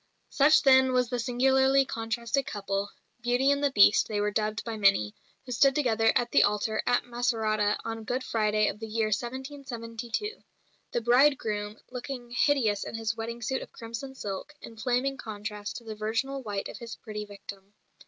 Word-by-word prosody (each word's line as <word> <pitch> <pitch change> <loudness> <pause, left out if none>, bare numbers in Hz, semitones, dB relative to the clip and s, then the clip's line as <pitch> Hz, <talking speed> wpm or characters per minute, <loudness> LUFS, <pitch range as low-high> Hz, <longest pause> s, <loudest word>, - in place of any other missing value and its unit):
Such 295 +2 +5
then 260 -1 +6
was 250 -2 +2
the 245 -1 -2
singularly 265 +3 +3
contrasted 235 +3 -2
couple 200 -2 -3 0.3
"Beauty 245 +3 +2
and 285 0 0
the 285 - +4
Beast" 205 -5 +5
they 210 -1 -2
were 210 0 0
dubbed 215 +1 -1
by 230 -1 -4
many 195 - +3 0.3
who 250 - -8
stood 270 +3 +4
together 225 -6 +3
at 240 0 +1
the - - +5
altar 210 +1 +1
at 245 - +2
Macerata 220 -4 0
on 225 -1 -4
Good 250 +4 -2
Friday 215 -3 +1
of 210 - -3
the 225 - -6
year 220 0 0
1772 245 - -4 0.5
the 240 - -1
bridegroom, 225 -4 +2
"looking 250 -1 -6
hideous 240 -6 +2
in - - -6
his 225 0 -2
wedding 230 +1 -5
suit 265 +4 -1
of - - -10
crimson 235 +3 -7
silk," 205 +6 -6
in 230 - -11
flaming 250 +4 0
contrast 210 -2 -6
to 235 - -10
the 220 -1 -6
virginal 225 +6 -2
white 205 -4 -4
of - - -9
his 235 -2 -7
pretty 210 -1 -6
victim. 200 0 -11
230 Hz, 175 wpm, -28 LUFS, 215-260 Hz, 0.5 s, then